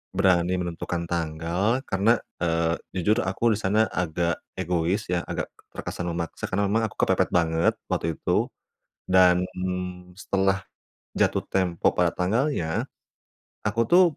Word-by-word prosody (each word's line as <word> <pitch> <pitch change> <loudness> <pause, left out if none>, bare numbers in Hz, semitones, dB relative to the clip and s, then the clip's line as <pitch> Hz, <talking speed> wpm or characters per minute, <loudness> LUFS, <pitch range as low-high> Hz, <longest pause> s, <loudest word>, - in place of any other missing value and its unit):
Berani 90 -2 +3
menentukan 85 0 -3
tanggal 85 +8 -1
karena, 105 +5 +3 0.2
eee, 85 -1 +1 0.2
jujur 105 +6 +2
aku 95 +5 +1
di 100 - -2
sana 105 +3 +3
agak 85 -1 -1 0.2
egois 90 +2 0
ya, 90 -1 +1
agak - - -3
t - - -46 0.2
terkesan 90 - -4
memaksa 85 -1 -4
karena 100 +2 +1
memang 115 +1 +2
aku - - -14
kepepet - - +2
banget 80 -1 +3 0.2
waktu 80 -1 0
itu. - - +1 0.6
Dan, 90 -1 +6
mmm, 90 -1 -4
setelah 95 -1 +1 0.5
jatuh - - +2
tempo 90 -3 +1
pada 90 -1 +3
tanggalnya, 95 - 0 0.8
aku 105 +2 +1
tuh 180 +2 +7
90 Hz, 135 wpm, -25 LUFS, 85-100 Hz, 0.8 s, tuh